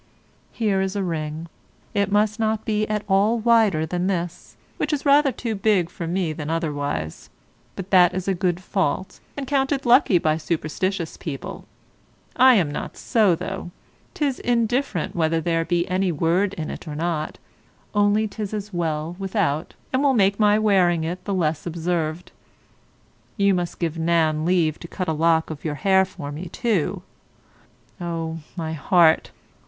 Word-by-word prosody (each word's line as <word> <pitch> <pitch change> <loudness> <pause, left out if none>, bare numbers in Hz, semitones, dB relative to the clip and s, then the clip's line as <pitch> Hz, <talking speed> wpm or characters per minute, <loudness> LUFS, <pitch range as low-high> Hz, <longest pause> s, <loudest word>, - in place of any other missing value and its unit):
Here 205 -4 0
is 190 +1 -2
a 200 - -1
ring: 160 -2 -4 0.5
it 200 -1 0
must 210 +1 +2
not 220 -1 0
be 215 -2 0
at 210 -1 -2
all 205 +4 +3
wider 220 -8 +3
than 180 +3 -2
this, 175 -2 -4 0.2
which 300 - -1
is 295 -1 -2
rather 285 0 +5
too 235 -3 -4
big 195 -4 +1
for 170 - -5
me 175 -2 -1
than 150 0 -6
otherwise; 145 - -3 0.5
but 190 0 -7
that 180 -2 +6
is 185 0 -3
a 195 - +2
good 180 -1 -1
fault, 190 -1 -2 0.2
and 280 - -3
counted 270 0 0
lucky 240 -5 +5
by 155 -2 +1
superstitious 165 +2 -2
people. 145 -5 -6 0.7
I 260 -1 +7
am 170 -8 +2
not - - -6
so, 210 -7 +3
though: 190 +1 -5 0.5
'tis 285 -4 -1
indifferent 240 - 0
whether 165 -1 +1
there 165 0 0
be 175 +1 0
any 185 0 +1
word 170 +5 +1
in't 160 0 -6
or 150 - -5
not; 160 -1 -2 0.6
only 205 +1 +3
'tis 210 0 -5
as 210 -1 -6
well 165 -1 -2
without, 190 -6 -1 0.2
and 260 - +2
will 280 -2 +3
make 200 -1 +3
my 210 -1 +5
wearing 185 -6 +3
it 175 +3 -4
the 200 - -2
less 160 -3 -1
observed. 170 0 -2 1.1
You 200 -1 +3
must 175 -2 -2
give 165 -1 -2
Nan 160 -2 +2
leave 170 -3 +2
to 170 - -9
cut 185 +1 -4
a 160 - +1
lock 160 +1 +2
of 150 - -8
your 155 -2 -2
hair 190 +3 +3
for 145 -6 -8
me, 160 +5 -6
too. 205 -4 -1 1.0
Oh, 165 -1 -3 0.2
my 160 -2 -3
heart! 160 +1 +3
180 Hz, 165 wpm, -23 LUFS, 165-210 Hz, 1.1 s, I